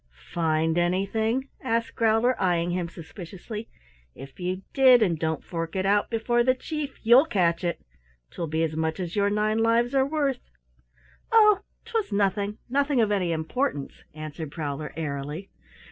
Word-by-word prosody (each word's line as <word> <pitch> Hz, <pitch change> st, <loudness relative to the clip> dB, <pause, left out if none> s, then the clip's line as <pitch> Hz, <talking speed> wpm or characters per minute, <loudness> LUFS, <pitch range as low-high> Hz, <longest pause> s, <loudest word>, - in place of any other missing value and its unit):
"Find 160 Hz, 0 st, +1 dB
anything?" 220 Hz, +9 st, 0 dB
asked 230 Hz, -2 st, -1 dB
Growler, 225 Hz, +3 st, +3 dB
eying 175 Hz, -2 st, +1 dB
him 175 Hz, -1 st, -2 dB
suspiciously. 190 Hz, +6 st, -9 dB, 0.5 s
"If 135 Hz, +4 st, -12 dB
you 185 Hz, +1 st, -3 dB
did, 255 Hz, -4 st, +7 dB
and 170 Hz, -6 st, 0 dB
don't 160 Hz, 0 st, -1 dB
fork 165 Hz, 0 st, -5 dB
it 190 Hz, 0 st, 0 dB
out 205 Hz, +1 st, +2 dB
before 240 Hz, +1 st, +1 dB
the 255 Hz, +1 st, +3 dB
Chief, 295 Hz, 0 st, -5 dB
you'll 245 Hz, +7 st, +6 dB
catch 170 Hz, -, +1 dB
it. 170 Hz, -1 st, -2 dB, 0.5 s
'Twill 170 Hz, -, -4 dB
be 160 Hz, +1 st, 0 dB
as 160 Hz, -1 st, -1 dB
much 160 Hz, +2 st, -1 dB
as 175 Hz, -2 st, -4 dB
your 200 Hz, -1 st, +2 dB
nine 215 Hz, +1 st, +1 dB
lives 230 Hz, +2 st, +2 dB
are 270 Hz, -1 st, +4 dB
worth!" 280 Hz, -4 st, -1 dB, 0.8 s
"Oh, 425 Hz, -3 st, +6 dB, 0.3 s
'twas 455 Hz, -, -2 dB
nothing 200 Hz, +1 st, 0 dB
nothing 280 Hz, +1 st, +1 dB
of 215 Hz, -2 st, +3 dB
any 185 Hz, -4 st, +1 dB
importance," 160 Hz, -, -2 dB
answered 155 Hz, 0 st, -6 dB
Prowler 150 Hz, -1 st, -4 dB
airily. 150 Hz, +3 st, -4 dB
200 Hz, 155 wpm, -26 LUFS, 165-240 Hz, 0.8 s, did